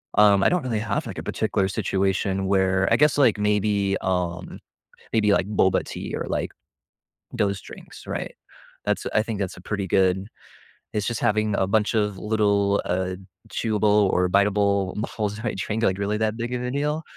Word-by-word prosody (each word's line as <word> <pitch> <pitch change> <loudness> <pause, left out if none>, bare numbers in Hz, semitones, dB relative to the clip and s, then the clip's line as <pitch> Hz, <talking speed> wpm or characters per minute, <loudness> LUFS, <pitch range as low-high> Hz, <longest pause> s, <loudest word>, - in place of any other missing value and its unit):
Um, 100 -1 +5
I - - +5
don't 180 -1 0
really 115 -4 -1
have, 105 -1 -2
like, - - -7
a - - -5
particular 95 - 0
situation 95 0 0
where 95 0 +2
I - - +6
guess, 150 0 +3
like, 125 -8 +4
maybe, 105 -1 +1
um 90 -2 -2 0.5
maybe, 105 -2 +3
like, 95 - +2
boba 95 -3 +2
tea - - -6
or, - - -3
like, - - -2 0.8
those 100 -2 0
drinks, - - -13
right? - - -4 0.5
That's - - -1
I 110 - +4
think 110 -1 -4
that's 95 -2 -3
a - - -11
pretty 100 +1 -3
good 95 +1 +2 0.7
it's 105 -1 -1
just 120 - -2
having 110 0 +1
a 95 - +1
bunch 105 +2 +1
of 105 -2 0
little, 100 -1 +1
uh, 90 +1 -1 0.4
chewable 105 -2 +2
or 90 0 +2
biteable 100 -1 +2 0.2
balls 105 -1 -2
in 110 - -8
my 120 - -1
drink, 105 +4 -3
like, 95 -1 +1
really 105 +1 -1
that 110 0 0
big 120 +1 -3
of 125 0 -2
a 125 - -2
deal? 150 +3 -1
100 Hz, 185 wpm, -24 LUFS, 95-110 Hz, 0.8 s, I